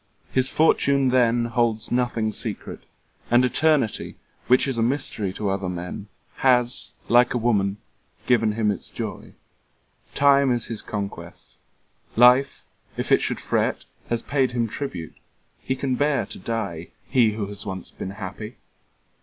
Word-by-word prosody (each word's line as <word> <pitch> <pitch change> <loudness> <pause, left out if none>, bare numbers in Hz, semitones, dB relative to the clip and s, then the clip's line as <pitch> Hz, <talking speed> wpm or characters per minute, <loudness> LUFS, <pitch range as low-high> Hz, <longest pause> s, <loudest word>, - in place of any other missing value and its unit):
His 130 0 +1
fortune 140 -3 +3
then 120 -2 +3
Holds 115 -2 0
nothing 120 -3 0
secret; - - -6 0.4
and 120 +1 +5
Eternity, 150 -3 +1 0.3
Which 125 +2 +4
is 130 -4 -1
a - - +2
mystery 115 -5 -1
to 100 0 -2
other 95 -1 -2
men, 90 +3 -6 0.3
Has 125 -2 +2
like 120 +1 +4
a - - +3
woman 105 -4 +1 0.5
given 115 -4 +3
him 105 -1 +1
its 100 - -6
joy. - - -6 0.8
5 - - -24
Time 140 -1 +4
is 120 -2 0
his 115 -2 -5
conquest. 100 -2 -7 0.6
Life, 125 +3 +5 0.3
if - - -3
it - - +5
should - - -2
fret. - - -1 0.3
Has 120 -1 -1
paid 135 -3 0
him 120 -2 0
tribute. 95 - -6 0.5
He 130 - -2
can 130 0 -2
bear 145 -2 +1
to - - -9
die, 90 -6 -4 0.2
He 120 -5 +3
who 105 -1 -3
has 100 +1 -8
once 95 -2 -6
been - - -6
happy! 100 +2 -7
120 Hz, 150 wpm, -24 LUFS, 105-130 Hz, 0.8 s, and